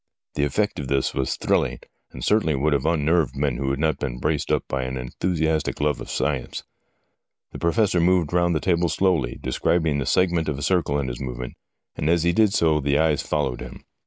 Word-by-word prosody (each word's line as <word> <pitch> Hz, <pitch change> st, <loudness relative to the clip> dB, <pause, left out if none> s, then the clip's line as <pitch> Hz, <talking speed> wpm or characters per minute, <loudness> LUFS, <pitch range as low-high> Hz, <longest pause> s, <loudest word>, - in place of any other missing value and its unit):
The 70 Hz, -, -1 dB
effect 105 Hz, +9 st, -1 dB
of 70 Hz, -, -4 dB
this 70 Hz, 0 st, 0 dB
was 65 Hz, -, -1 dB
thrilling, -, -, 0 dB, 0.3 s
and -, -, -7 dB
certainly 105 Hz, -8 st, +2 dB
would 75 Hz, +3 st, +1 dB
have 70 Hz, +2 st, 0 dB
unnerved 80 Hz, -2 st, +1 dB
men 70 Hz, -3 st, -1 dB
who 70 Hz, +1 st, -1 dB
had 70 Hz, -, -1 dB
not 80 Hz, 0 st, 0 dB
been -, -, -3 dB
braced 75 Hz, +3 st, -1 dB
up -, -, 0 dB
by 65 Hz, -, -2 dB
an 65 Hz, +1 st, -4 dB
enthusiastic 80 Hz, +4 st, -1 dB
love 75 Hz, -2 st, 0 dB
for -, -, -6 dB
science. -, -, -2 dB, 0.9 s
The -, -, -8 dB
Professor 90 Hz, +1 st, +2 dB
moved 85 Hz, -2 st, +2 dB
round 85 Hz, -1 st, +2 dB
the -, -, +1 dB
table 85 Hz, -2 st, +1 dB
slowly, 85 Hz, -12 st, +1 dB
describing 75 Hz, +4 st, +1 dB
the 65 Hz, -, -3 dB
segment 85 Hz, -4 st, +2 dB
of 70 Hz, -, -2 dB
a 70 Hz, -, -5 dB
circle 85 Hz, -5 st, +1 dB
in 70 Hz, -2 st, -2 dB
his -, -, -5 dB
movement, 60 Hz, -1 st, -5 dB, 0.4 s
and 75 Hz, -, -1 dB
as 85 Hz, -1 st, +3 dB
he 85 Hz, -, +3 dB
did 110 Hz, +1 st, +4 dB
so 80 Hz, -6 st, +2 dB
the 70 Hz, 0 st, +1 dB
eyes 80 Hz, -2 st, +2 dB
followed 75 Hz, -5 st, -2 dB
him. -, -, -9 dB
75 Hz, 210 wpm, -23 LUFS, 70-85 Hz, 0.9 s, did